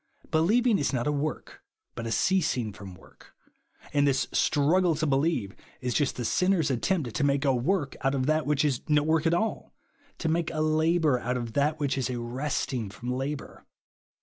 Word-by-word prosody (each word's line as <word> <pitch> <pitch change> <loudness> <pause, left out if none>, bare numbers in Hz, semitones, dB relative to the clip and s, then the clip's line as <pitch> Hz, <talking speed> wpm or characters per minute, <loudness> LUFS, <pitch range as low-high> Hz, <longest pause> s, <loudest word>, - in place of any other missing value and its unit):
Believing 210 +8 +3
is 140 - 0
not 120 -2 -1
a 150 - +1
work, 150 +1 -4 0.3
but 115 -1 -5
a - - -3
ceasing 130 - +1
from 95 -3 -10
work; - - -20 0.6
and 145 -1 +3
this 135 -1 +1
struggle 165 +4 +2
to 155 +1 -1
believe, 135 - 0 0.2
is 125 -1 -2
just 145 -3 +1
the 120 - -4
sin 180 +10 +1
ner's 160 -6 +1
attempt 130 - -1
to 105 - -1
make 140 0 +1
a - - +3
luork 135 +4 0
out 135 +1 +1
of 130 -1 0
that 155 +1 +1
which 150 0 +2
is 135 -5 0
no 150 -1 +4
work 160 +1 +2
at 165 - +2
all, 220 +5 -3 0.4
to 160 - -3
make 165 0 0
a 155 - -4
labour 155 -2 +2
out 125 +2 -2
of 120 -2 -5
that 150 +2 +1
which 140 -2 0
is 130 - -1
a 125 - -3
resting 125 -2 -3
from 120 +5 -5
labour. 135 +3 -5
145 Hz, 200 wpm, -27 LUFS, 125-160 Hz, 0.6 s, no